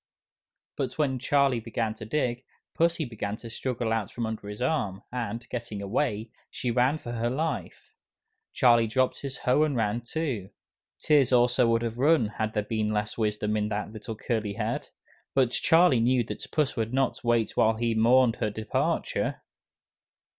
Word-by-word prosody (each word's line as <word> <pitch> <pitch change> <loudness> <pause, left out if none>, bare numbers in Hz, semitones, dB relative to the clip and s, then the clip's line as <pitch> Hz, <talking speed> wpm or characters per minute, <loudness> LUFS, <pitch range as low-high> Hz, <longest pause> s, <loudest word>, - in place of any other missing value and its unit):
But - - -3
when 135 -4 +1
Charlie 140 -1 +2
began 115 -1 -2
to 110 0 -9
dig, 125 0 -1 0.3
Pussy 170 -1 +1
began 105 -4 -4
to 115 +1 -10
struggle 120 -2 -2
out 115 -3 -1
from 120 - -4
under 110 -2 -5
his 105 0 -7
arm, 105 -8 -1
and, 120 -2 -4
getting 115 -4 -5
away, 110 +1 -1 0.2
she 125 - -3
ran 125 +5 +2
for 120 - -7
her 120 0 -1
life. 155 +6 -4 0.6
Charlie 120 -2 +4
dropped 130 +3 0
his 135 -2 -5
hoe 125 +4 +2
and 155 -3 +2
ran 110 0 0
too. 120 - -3 0.5
Tears 145 -5 +3
also 125 0 +4
would 115 0 +2
have 115 0 -4
run 145 -5 +4
had 110 +1 -3
there 105 - +1
been 110 0 -1
less 105 0 -2
wisdom 105 -1 -1
in 105 0 0
that 105 0 -3
little 110 +1 -6
curly 110 -2 -2
head. 115 +2 -3 0.5
But 130 -3 +3
Charlie 165 -5 +4
knew 120 +1 +3
that 115 - -7
Puss 150 -3 +1
would 115 +1 -2
not 135 -2 0
wait 115 -2 +1
while 110 0 +3
he 115 +1 0
mourned 120 +2 +4
her 110 - 0
departure! 110 +1 -1
115 Hz, 170 wpm, -27 LUFS, 110-130 Hz, 0.6 s, Charlie